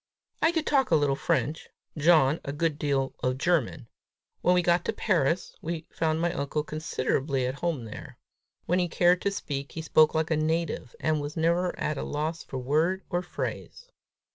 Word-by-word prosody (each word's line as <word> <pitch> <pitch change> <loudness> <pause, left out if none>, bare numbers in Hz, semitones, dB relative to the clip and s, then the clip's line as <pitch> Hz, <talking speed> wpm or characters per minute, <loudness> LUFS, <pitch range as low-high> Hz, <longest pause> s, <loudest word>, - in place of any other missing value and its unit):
I 325 - +4
could 320 -2 -1
talk 275 -2 +2
a 165 - +4
little 145 -2 +2
French, 150 +1 -1 0.3
John 155 -2 +4
a 140 - -4
good 150 +1 -1
deal 135 -3 0
of 125 0 0
German. 155 -7 0 0.5
When 180 - +4
we 180 - +3
got 175 0 +3
to - - 0
Paris, 170 -3 0
we 165 0 -4
found 160 -1 0
my 170 +1 0
uncle 150 -1 -2
considerably 140 -3 -1
at 130 +2 -3
home 160 -9 -1
there. 110 - -9 0.5
When 180 +2 +2
he 180 - +1
cared 175 +1 +3
to 200 - +1
speak, 140 -8 -5
he 160 - -4
spoke 155 -1 +4
like 160 0 0
a - - +4
native, 155 -5 -1
and 155 -1 +1
was 145 +2 -6
never 170 +2 +1
at 150 -2 -1
a - - -3
loss 155 +3 -3
for 130 - -6
word 155 +9 +1
or 175 - +1
phrase. - - -6
160 Hz, 190 wpm, -27 LUFS, 145-175 Hz, 0.5 s, I